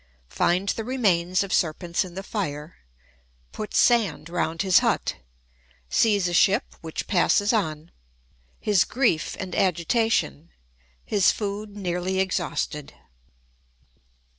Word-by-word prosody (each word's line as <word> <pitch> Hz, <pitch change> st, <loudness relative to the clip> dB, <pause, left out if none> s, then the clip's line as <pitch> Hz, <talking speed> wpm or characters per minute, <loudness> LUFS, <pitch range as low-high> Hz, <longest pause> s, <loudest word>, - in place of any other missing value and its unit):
Finds 185 Hz, +3 st, +1 dB
the 225 Hz, -, -5 dB
Remains 185 Hz, -8 st, +1 dB
of 195 Hz, -, -5 dB
Serpents 170 Hz, +1 st, 0 dB
in 180 Hz, -2 st, -11 dB
the 195 Hz, -, -5 dB
Fire—Puts 65 Hz, -, -7 dB
Sand 225 Hz, -9 st, +2 dB
round 165 Hz, -1 st, -1 dB
his 190 Hz, -2 st, +5 dB
Hut—Sees 60 Hz, -, -2 dB
a 175 Hz, -, -3 dB
Ship, 200 Hz, +6 st, +4 dB, 0.2 s
which 160 Hz, -1 st, -5 dB
passes 205 Hz, +3 st, +2 dB
on—His 150 Hz, -, -3 dB
Grief 230 Hz, -10 st, 0 dB
and 185 Hz, -, -5 dB
Agitation—His 170 Hz, -, -1 dB
Food 205 Hz, 0 st, -5 dB
nearly 185 Hz, 0 st, -2 dB
exhausted. 175 Hz, -5 st, -2 dB
175 Hz, 95 wpm, -24 LUFS, -, 0.2 s, his